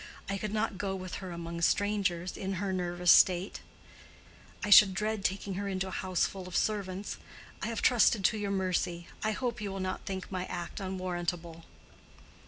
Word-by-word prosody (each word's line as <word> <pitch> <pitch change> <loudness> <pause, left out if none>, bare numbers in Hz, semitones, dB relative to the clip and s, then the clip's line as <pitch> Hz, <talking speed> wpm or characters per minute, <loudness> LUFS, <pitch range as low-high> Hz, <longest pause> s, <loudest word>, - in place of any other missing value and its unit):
I 195 0 -2
could 210 0 -3
not 215 -2 -1
go 195 -1 -1
with 185 -1 -5
her 190 - -6
among 170 0 -5
strangers, 185 -2 +1
and - - -7
in 190 +1 -1
her 190 +1 -2
nervous 175 -1 +2
state 185 +1 +4 1.0
I 205 - -2
should 195 -2 +9
dread 215 0 -1
taking 195 0 -1
her 200 +2 -3
into 190 -1 -2
a - - -7
house 185 -1 0
full 190 -2 -6
of 180 - -7
servants. 200 -2 -2 0.4
I - - -2
have 230 -1 -3
trusted 230 -4 +4
to 220 - +3
your 205 -1 -2
mercy. 180 -3 -1 0.2
I 215 0 +1
hope 240 0 -3
you 205 -2 -3
will 195 - -5
not 185 0 -4
think 190 0 -5
my 185 -1 -2
act 175 - -5
unwarrantable." 175 -3 -4
190 Hz, 190 wpm, -31 LUFS, 180-205 Hz, 1.0 s, should